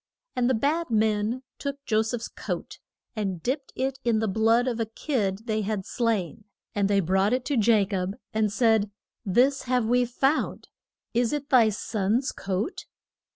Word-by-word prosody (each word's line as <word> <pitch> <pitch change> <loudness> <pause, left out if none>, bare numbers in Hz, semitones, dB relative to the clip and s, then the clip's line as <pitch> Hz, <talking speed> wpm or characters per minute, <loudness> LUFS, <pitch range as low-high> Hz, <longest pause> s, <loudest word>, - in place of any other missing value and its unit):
And 245 0 +2
the 260 - +3
bad 300 +8 0
men 220 +2 +1 0.2
took 280 0 -5
Jo 220 -4 +3
seph's 225 +1 -3
coat - - -6 0.4
and 195 -6 -3
dipped 270 +2 -2
it 265 +1 -2
in 235 -2 +2
the 220 0 0
blood 225 +4 +3
of 240 -2 -1
a 225 - 0
kid 220 -4 -2
they 215 -2 0
had 205 -2 -2
slain. 215 -5 -1 0.3
And 200 -1 +1
they 200 -1 +3
brought 190 +5 +2
it 255 0 0
to 290 - 0
Ja 220 -3 +4
cob, 190 0 -2 0.2
and 215 -1 +1
said, 220 -2 +3 0.3
This 255 +8 +2
have 250 -2 +1
we 245 +2 +3
found. 270 +5 0 0.4
Is 235 +1 +1
it 290 -1 -3
thy 240 -5 +6
son's 215 +4 0
coat? 195 - -3
225 Hz, 170 wpm, -26 LUFS, 205-250 Hz, 0.4 s, thy